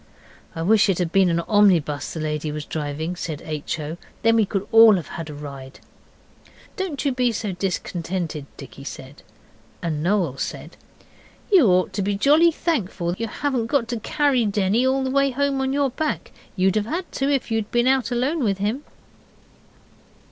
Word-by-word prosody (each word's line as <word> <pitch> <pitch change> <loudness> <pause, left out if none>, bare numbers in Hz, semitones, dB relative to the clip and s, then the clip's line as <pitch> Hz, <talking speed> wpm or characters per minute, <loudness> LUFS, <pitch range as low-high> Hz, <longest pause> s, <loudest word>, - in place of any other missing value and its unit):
'I 165 - -3
wish 210 +2 +4
it 190 - +2
had 175 -3 -1
been 190 -1 +4
an 170 0 +1
omnibus 170 -9 +2
the 160 - -5
lady 150 0 -2
was 150 0 -5
driving,' 155 +3 -4
said 160 -4 -5
H. 155 0 -4
O., 155 +2 -5 0.3
'then 230 0 +4
we 220 -3 +3
could 200 0 -3
all 225 -1 +8
have 175 -5 -4
had 165 -2 -6
a - - -7
ride.' 140 -2 -9 1.0
'Don't 355 -9 -3
you 280 - +3
be 250 -1 +1
so 210 -2 -3
discontented,' 175 -4 -3
Dicky 135 0 -11
said. 135 0 -9 0.6
And 155 -3 -3
Noel 175 -6 0
said - - -5 0.8
'You 355 - +6
ought 185 -1 +2
to 205 - -2
be 200 +1 0
jolly 300 +9 +5
thankful 200 - -2
you 230 +3 -3
haven't 255 -1 -2
got 240 -2 +1
to 235 -1 -2
carry 280 +1 +1
Denny 205 +5 +1
all 265 +1 +1
the 260 - -1
way 275 0 +3
home 275 +1 0
on 265 0 0
your 280 -1 +1
back. 310 +4 -3 0.2
You'd 190 +1 +2
have 210 0 -1
had 345 +6 -4
to 270 +1 -1
if 270 -4 -1
you'd 220 -1 -1
been 240 0 +1
out 260 -2 +2
alone 260 +5 0
with 200 -4 +1
him. 215 +8 -2
205 Hz, 185 wpm, -23 LUFS, 165-260 Hz, 1.0 s, all